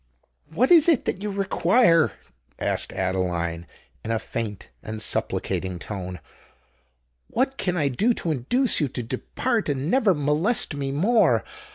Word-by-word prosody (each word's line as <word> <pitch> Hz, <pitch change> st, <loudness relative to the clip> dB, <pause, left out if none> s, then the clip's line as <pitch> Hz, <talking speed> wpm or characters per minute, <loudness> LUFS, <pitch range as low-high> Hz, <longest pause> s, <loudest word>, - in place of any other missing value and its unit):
"What 230 Hz, -, +1 dB
is 335 Hz, -1 st, +7 dB
it 310 Hz, -7 st, +3 dB
that 190 Hz, -, -2 dB
you 210 Hz, -, -3 dB
require?" 190 Hz, -2 st, +3 dB, 0.4 s
asked -, -, -1 dB
Adeline, 90 Hz, -3 st, -2 dB, 0.4 s
in -, -, -6 dB
a 115 Hz, -, +1 dB
faint 110 Hz, -2 st, -5 dB
and 110 Hz, 0 st, -6 dB
supplicating 95 Hz, -3 st, -1 dB
tone: 90 Hz, 0 st, -6 dB, 1.1 s
"what 265 Hz, +3 st, -1 dB
can 180 Hz, -1 st, 0 dB
I 150 Hz, -4 st, +2 dB
do 205 Hz, -, +1 dB
to 165 Hz, -, -2 dB
induce 195 Hz, -, +1 dB
you 145 Hz, -, +2 dB
to 125 Hz, -1 st, -5 dB
depart 215 Hz, -, -2 dB
and 140 Hz, +4 st, -1 dB
never 220 Hz, -8 st, +3 dB
molest 150 Hz, -, +1 dB
me 140 Hz, -1 st, -3 dB
more? 210 Hz, -, +3 dB
150 Hz, 145 wpm, -24 LUFS, -, 1.1 s, is